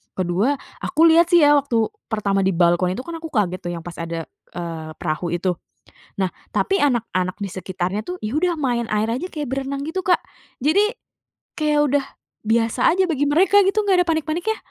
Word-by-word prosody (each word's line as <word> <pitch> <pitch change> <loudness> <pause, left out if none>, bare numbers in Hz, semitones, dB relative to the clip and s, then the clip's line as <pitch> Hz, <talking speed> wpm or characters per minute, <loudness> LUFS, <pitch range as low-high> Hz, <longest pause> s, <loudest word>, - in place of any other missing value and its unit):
Kedua 190 +9 +1 0.2
aku 320 - +1
lihat 335 +1 +5
sih 345 -3 +6
ya, 290 0 +6
waktu 235 -6 0 0.2
pertama 200 -3 0
di 190 -1 +1
balkon 175 +1 +2
itu 255 - -5
kan 335 -1 -7
aku 325 - -6
kaget 200 - 0
tuh 175 -1 -5
yang 165 - -7
pas 175 0 -8
ada, 165 0 -4 0.3
eee, 165 -2 -5
perahu 170 +2 -2
itu. 180 +1 0 0.7
Nah, 190 - +2 0.2
tapi 390 - +1
anak-anak 210 -9 0
di 200 - -3
sekitarnya 185 +2 -3
tuh, 360 0 -6
ya 215 +6 -3
udah 340 0 0
main 240 -4 0
air 215 +1 +1
aja, 255 +11 -2
kayak 295 -3 -4
berenang 275 +1 -3
gitu 370 +3 -3
Kak, 360 - +3 0.4
jadi, 400 - +3 0.7
kayak 300 -1 +2
udah 285 -2 +2 0.4
biasa 225 +1 +2
aja 375 +3 +2
bagi 290 -3 0
mereka 380 +7 +5
gitu, 395 +3 +2
gak 370 -2 +4
ada - - -20
panik-paniknya. 330 +7 -1
245 Hz, 190 wpm, -21 LUFS, -, 0.7 s, sih